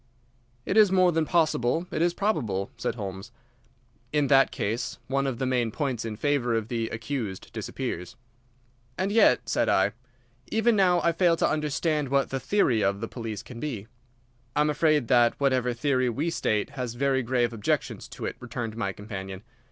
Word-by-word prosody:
"It 200 - 0
is 210 -3 +7
more 185 -1 +4
than 160 -1 +1
possible; 160 -2 +1
it - - -1
is 175 0 +2
probable," 120 - -1
said 115 - -3
Holmes. 100 0 -6 0.8
"In 145 -2 +1
that 135 -1 +6
case 110 +4 -3
one 135 +1 0
of 130 -3 -2
the 130 - -1
main 125 -3 +1
points 125 -2 -2
in 110 -2 -4
favour 125 -2 +1
of 110 0 -2
the 115 -2 -2
accused 115 -4 -5
disappears." 90 +1 -5 0.8
"And 190 +2 0
yet," 225 +2 +4
said - - +1
I, 95 +1 +3 0.6
"even 225 +1 +2
now 180 -3 +4
I 170 - +4
fail 170 0 +3
to - - +2
understand 150 -1 0
what 140 0 +1
the 135 - -1
theory 130 - +2
of 100 0 +1
the 115 - -4
police 115 -4 -6
can 120 -2 -10
be." 120 -9 -4 0.7
"I 150 - +3
am 150 0 +3
afraid 150 -4 +2
that 120 -2 +4
whatever 130 -3 +2
theory 130 +1 +1
we 150 +8 -1
state 105 -10 0
has 125 -3 -4
very 135 +1 +1
grave 120 -1 0
objections 105 -3 -2
to - - -7
it," - - -3
returned 115 -2 -5
my 100 -4 -2
companion. 95 -2 -7
130 Hz, 180 wpm, -27 LUFS, 115-150 Hz, 0.8 s, is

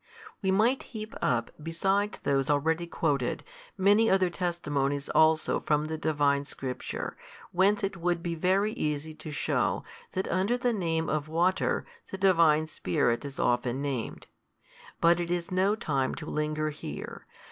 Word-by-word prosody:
We 190 - 0
might 220 +7 +3 0.2
heap 215 +1 -6
up, 120 -2 +1
besides 195 +6 0
those 135 -1 0
already 160 +4 +1
quoted, 140 -7 -1 0.3
many 205 +4 +4
other 190 -2 +3
testimonies 145 -6 -1
also 160 0 +3
from 150 0 +1
the 160 0 -3
Divine 145 -3 +2
Scripture, 130 -2 -5 0.4
whence 200 +4 +3
it 195 -1 -2
would 170 0 -1
be 170 -2 -2
very 190 +6 +1
easy 150 -2 -2
to 155 - -9
shew, 145 - 0 0.3
that 190 - -1
under 195 +6 +1
the 245 -1 +1
name 165 -5 -1
of 155 -1 -1
water, 175 +4 +1 0.2
the 190 - -5
Divine 165 -5 +4
Spirit 140 -6 0
is 140 -1 -7
often 125 +2 0
named. 135 -5 -3 0.7
But 170 +1 +4
it 170 -1 -2
is 175 +1 -2
no 190 +3 +2
time 140 - -1
to 155 - -7
linger 155 0 -1
here. 150 - -8
165 Hz, 150 wpm, -29 LUFS, 145-190 Hz, 0.7 s, many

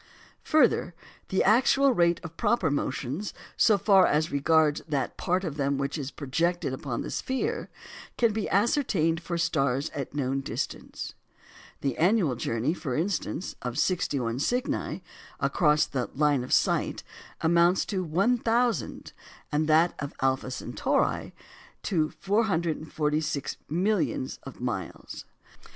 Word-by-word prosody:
Further, 255 - +3 0.3
the 190 - +2
actual 265 +5 +4
rate 170 -4 +3
of 165 -1 -8
proper 210 -7 +1
motions, 140 +6 -3 0.2
so 215 -3 +4
far 195 0 +5
as 155 +2 +1
regards 150 +1 +3
that 140 -3 -1
part 185 +1 0
of 155 -5 -4
them 140 -1 0
which 140 0 -2
is 140 -4 -4
projected 165 +2 -1
upon 130 -2 -4
the - - -6
sphere, 260 0 -2 0.5
can 230 -3 +3
be 215 -1 -2
ascertained 190 - +2
for 170 0 -3
stars 140 -5 0
at 140 -1 -6
known 135 -1 -1
distance. - - -5 0.7
The 135 -3 -1
annual 175 - +3
journey, 115 +5 -1
for 150 -8 -4
instance, 180 +2 -2
of 125 0 -4
61 135 -9 0
Cygni 245 - -1 0.4
across 150 -3 +3
the 130 -3 -3
line 145 -2 +2
of 125 - -8
sight - - +1 0.4
amounts 170 +2 +3
to 190 -3 -2
1,000, 230 +7 0 0.4
and 155 +1 +1
that 160 +2 +4
of 140 -1 -5
Alpha 130 -1 0
Centauri 130 - -1 0.5
to 155 -5 +1
446 160 - -1
millions 180 -5 0
of 135 - -11
miles. 115 -8 -5
160 Hz, 130 wpm, -27 LUFS, 140-190 Hz, 0.7 s, far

